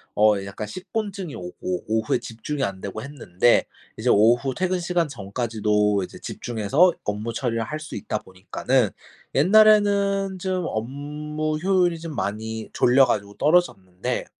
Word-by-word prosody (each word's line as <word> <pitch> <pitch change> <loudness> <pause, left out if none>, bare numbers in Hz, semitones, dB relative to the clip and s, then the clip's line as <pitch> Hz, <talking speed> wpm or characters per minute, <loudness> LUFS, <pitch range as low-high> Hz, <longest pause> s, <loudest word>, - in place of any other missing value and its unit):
어 105 -2 +4
약간 100 +2 -6
식곤증이 190 - -5
오고 90 0 -5
오후에 110 0 +1
집중이 135 +6 -5
안 95 -1 -3
되고 100 +2 -5
했는데 120 -5 +2 0.3
이제 - - 0
오후 120 +5 +4
퇴근 185 0 0
시간 175 -1 0
전까지도 105 -3 0
이제 - - -9
집중해서 120 - +1
업무 105 +3 -3
처리를 115 -1 -1
할 150 +7 -5
수 155 - -8
있다 - - -3
보니까는 105 +6 -1 0.5
옛날에는 200 -2 +4
좀 185 -1 -2
업무 150 +6 -3
효율이 180 -1 +2
좀 165 -2 -7
많이 110 +2 -4
졸려 130 +2 +5
가지고 100 -4 -2
떨어졌는데 100 - 0
125 Hz, 315 characters per minute, -24 LUFS, 105-175 Hz, 0.5 s, 졸려